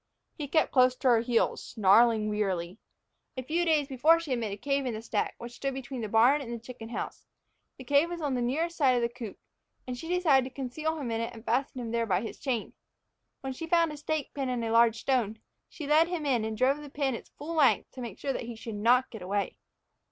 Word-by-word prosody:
He 295 -3 -5
kept 315 +3 +2
close 255 -1 +4
to 260 - +1
her 235 -2 +5
heels, 235 0 +1
snarling 215 +1 +4
wearily. 195 -3 -2 0.6
A 255 - -3
few 330 +6 0
days 305 -4 +2
before 305 +5 +4
she 330 -4 -6
had 250 - +1
made 220 -3 -3
a 200 - -5
cave 275 +3 -1
in 235 - -2
the 215 - -5
stack, - - -1
which 235 0 -8
stood 270 +2 -4
between 265 -1 -6
the 215 - -4
barn 245 +7 +5
and 240 -4 -7
the 235 - -3
chicken 230 -1 -10
house. 240 - -6 0.5
The 260 - -9
cave 285 +6 +3
was 345 -1 -5
on 290 -4 -1
the 250 - 0
side 240 - 0
nearest 330 +7 -1
the 250 -4 +3
coop, 230 -6 -7 0.5
and 250 - -4
she 285 +7 -8
decided 300 -8 +3
to 260 - -32
conceal 305 +5 -3
him 265 -6 -4
in 225 0 -1
it 230 +1 -4
and 225 +1 -12
fasten 255 +2 0
him 230 -2 -5
there 230 -1 0
by 190 -2 +1
his 225 - -7
chain. 245 -6 -2 0.7
When 265 -1 -4
she 330 +6 -6
had - - -14
found 335 -2 +4
a 300 - -7
stake 300 -1 -3
pin 270 -2 -2
and 240 -2 -1
a 225 - -2
large 230 -1 +4
stone, 235 -5 0 0.3
she 305 - -7
led 310 +3 +4
him 345 -4 -3
in 245 -6 +1
and 220 0 -4
drove 270 +5 +2
the 295 - -9
pin 275 -1 -1
its 230 - -8
full 320 +3 -7
length 300 -5 +3
to 255 - -9
make 230 -6 -6
sure 275 - -2
that 245 - -4
he 235 0 -7
should 225 0 -7
not 245 +5 +3
get 220 - -8
away. 200 +2 -2
255 Hz, 250 wpm, -29 LUFS, 230-285 Hz, 0.7 s, her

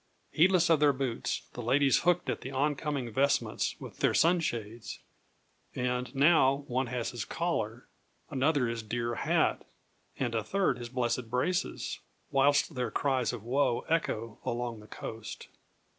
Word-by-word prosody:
Heedless 175 0 +4
of 160 - +5
their 145 -1 +5
boots, 130 -3 -2
the 120 - -6
ladies 135 +3 +3
hooked 175 0 +2
at - - -2
the 130 - -6
oncoming 140 -2 -1
vestments 140 +5 +1
with - - -10
their - - +2
sunshades; 140 -11 0 0.8
and, 125 +1 -2
now, 140 -1 +4
one 130 +1 0
has 120 -1 -2
his - - -4
collar, - - -2 0.4
another 140 -1 +2
his 115 0 -3
dear 120 +2 -2
hat, - - +1 0.5
and 120 -3 -1
a 110 -1 0
third 185 - 0
his 120 -1 -6
blessed 120 -1 -1
braces, 130 +9 -1 0.3
whilst 140 +3 +3
their 125 -3 -2
cries 130 +1 0
of 120 -4 -7
woe 125 0 +1
echo 115 -9 -1
along 120 -1 -3
the 105 - -14
coast. 110 0 -8
130 Hz, 145 wpm, -30 LUFS, 120-145 Hz, 0.8 s, of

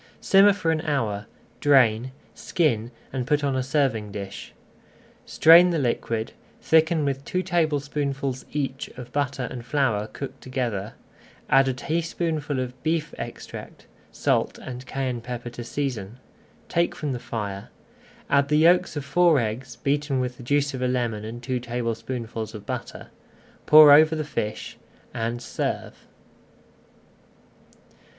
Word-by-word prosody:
Simmer 195 +1 +6
for 165 -4 0
an 160 -1 0
hour, 110 -10 -2 0.3
drain, 130 -4 +4 0.2
skin, 120 -10 0 0.2
and 125 -2 -3
put 145 0 +1
on 140 -2 0
a 130 - +1
serving 130 -6 0
dish. 100 -1 -7 0.8
Strain 170 +3 +7
the 170 - 0
liquid, 115 -3 -1 0.3
thicken 160 -1 +3
with 135 -1 -2
two 185 +5 -2
tablespoonfuls 145 -6 -1
each 135 -2 -3
of 125 -1 -9
butter 140 -3 -1
and 120 -2 -6
flour 125 -6 0
cooked 135 +5 -8
together, 115 -5 -3 0.6
add 135 0 +6
a 130 - +1
teaspoonful 155 -1 -2
of 125 0 -5
beef 160 -1 -1
extract, - - -8 0.3
salt - - 0
and 125 0 -8
cayenne 130 -3 -3
pepper 120 0 -6
to 120 0 -7
season, 120 -4 -4 0.5
take 170 0 0
from 150 -2 -3
the 125 - -3
fire, 100 -4 -5 0.6
add 140 0 +3
the 150 +1 +2
yolks 170 +2 +4
of 145 -2 -4
four 170 +2 +4
eggs, 115 +3 -4
beaten 145 -2 -1
with 125 -1 -3
the - - -11
juice 145 +3 +1
of 130 - -5
a 125 - +1
lemon 120 -4 -1
and 115 +2 -7
two 125 +1 -1
tablespoonfuls 115 -1 -4
of 105 -1 -9
butter, - - -6 0.6
pour 155 -1 +9
over 155 +2 +6
the 155 - -2
fish, 110 -7 -4 0.3
and 115 +1 -3
serve. - - -4
130 Hz, 140 wpm, -25 LUFS, 120-150 Hz, 0.8 s, pour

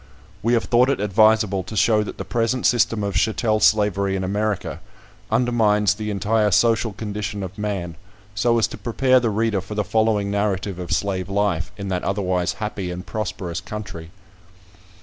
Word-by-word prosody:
We 115 +4 +1
have 115 - +2
thought 125 +2 +3
it 140 - 0
advisable 105 -1 +3
to 95 +4 -7
show 105 +2 +4
that 105 - -6
the - - -5
present 120 +1 -1
system 115 -3 +2
of 100 -1 -2
chattel 110 0 +1
slavery 105 -2 +2
in 95 - -2
America 105 +1 -2 0.5
undermines 105 -4 +2
the 105 0 -5
entire 105 +2 +1
social 115 +3 +2
condition 105 -1 -5
of 95 0 -7
man, 100 -5 -3 0.4
so 115 +4 +2
as 115 - +3
to - - -9
prepare 130 +2 +3
the 120 -2 0
reader 110 -2 0
for 95 +3 -8
the 105 - 0
following 110 -2 +1
narrative 100 -2 -1
of 90 - -6
slave 95 -2 -1
life, 100 -4 0
in 100 -1 -5
that 90 -1 -2
otherwise 90 -3 0
happy 105 -3 -4
and 90 +1 -6
prosperous 105 -5 -4
country. 90 -6 -7
105 Hz, 170 wpm, -22 LUFS, 95-110 Hz, 0.5 s, show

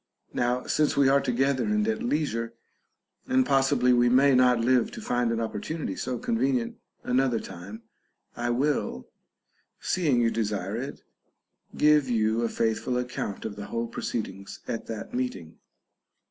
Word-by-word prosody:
Now, 125 +1 0
since 150 -2 +1
we 140 -1 +5
are 140 +1 +4
together 130 +2 +1
and 215 0 +1
at 225 +1 -1
leisure, 115 - -1 0.7
and 260 0 +3
possibly 135 - +3
we 120 0 +4
may 135 +3 +5
not 125 -1 +5
live 120 0 +3
to - - -7
find 125 - 0
an 115 - 0
opportu 115 +7 -3
nity 100 - -3
so 125 +5 -3
convenient 120 +1 0 0.3
another 125 -2 +1
time, 100 +6 -9 0.5
I 120 0 -2
will 120 - -1 0.7
(seeing 155 -9 +1
you 115 -1 +3
desire 105 -3 -2
it) 135 +5 -6 0.7
give 150 -3 +4
you 110 -1 +1
a 115 - 0
faithful 115 +3 0
account 125 -5 -4
of 105 -2 -4
the 100 0 -7
whole 115 0 -2
proceedings 105 -4 -5
at 115 - -4
that 110 -2 -6
meeting. 110 -10 -4
125 Hz, 150 wpm, -27 LUFS, 115-135 Hz, 0.7 s, we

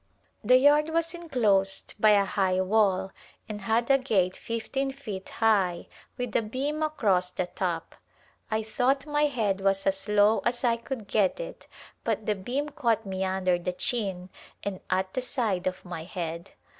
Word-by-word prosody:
The 250 +4 +6
yard 295 +3 +5
was 330 +1 0
enclosed 220 - +1
by 215 - +6
a 200 -1 +5
high 190 -2 +1
wall 190 -1 +2 0.4
and 210 -1 -6
had 225 +5 +1
a 275 - +5
gate 190 -8 +1
fifteen 265 +4 -3
feet 220 -9 -7
high 200 -6 +1 0.3
with 245 -3 -4
a - - +4
beam 270 +8 -3
across 210 -13 +1
the 180 0 -2
top. 175 -2 -3 0.6
I 220 0 0
thought 260 +5 0
my 295 0 +2
head 210 -8 -1
was 195 0 +1
as 195 +1 0
low 210 +1 +4
as 240 +1 -2
I 235 -2 +3
could 235 -2 -6
get 200 - +1
it - - -8 0.4
but 220 -2 -1
the 210 - +2
beam 250 +10 -3
caught 230 -7 0
me 190 -1 -3
under 185 -1 +1
the 180 +1 -3
chin 190 -4 -2 0.3
and 195 -2 -3
at 190 0 0
the 255 - -1
side 225 -8 -1
of 185 0 -4
my 175 -3 -6
head. 170 -1 -5
210 Hz, 170 wpm, -27 LUFS, 190-255 Hz, 0.6 s, The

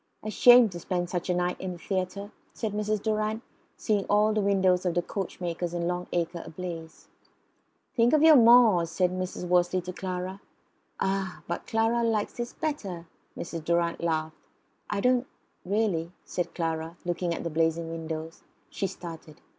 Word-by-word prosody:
"A 215 - -3
shame 245 +2 +8
to 175 -2 -7
spend 175 0 -2
such 180 0 -3
a 180 - +2
night 180 0 -1
in 185 -1 -3
the - - -9
theatre!" 195 +3 -3 0.2
said 220 -3 -3
Mrs. 210 0 -1
Durrant, 215 +1 -1 0.3
seeing 210 -3 0
all 210 +1 +3
the 215 - +1
windows 190 -2 +3
of 180 -3 -1
the 175 - +1
coachmakers 175 -3 -4
in 170 0 -1
Long 180 0 -2
Acre 170 0 -1
ablaze. 165 -2 -8 0.9
"Think 235 0 +4
of 310 0 +5
your 320 -1 +9
moors!" 230 - +6
said 180 +2 +1
Mr. 185 -1 -4
Wortley 180 +1 +3
to 180 +1 -6
Clara. 185 +1 -4 0.6
"Ah! 195 -1 -2
but 170 - -4
Clara 225 +1 +2
likes 225 -3 0
this 240 0 -4
better," 200 - -4 0.3
Mrs. 165 -2 -5
Durrant 170 0 0
laughed. 160 -1 -1 0.5
"I 205 -1 -1
don't 250 +2 +4
know 245 - -10 0.5
really," 190 -6 0
said 175 - -3
Clara, 165 0 -3
looking 175 0 -1
at - - -5
the 170 - -3
blazing 165 +1 0
windows. 160 0 -6 0.3
She 195 - -2
started. 165 -4 -9
180 Hz, 170 wpm, -28 LUFS, 170-210 Hz, 0.9 s, your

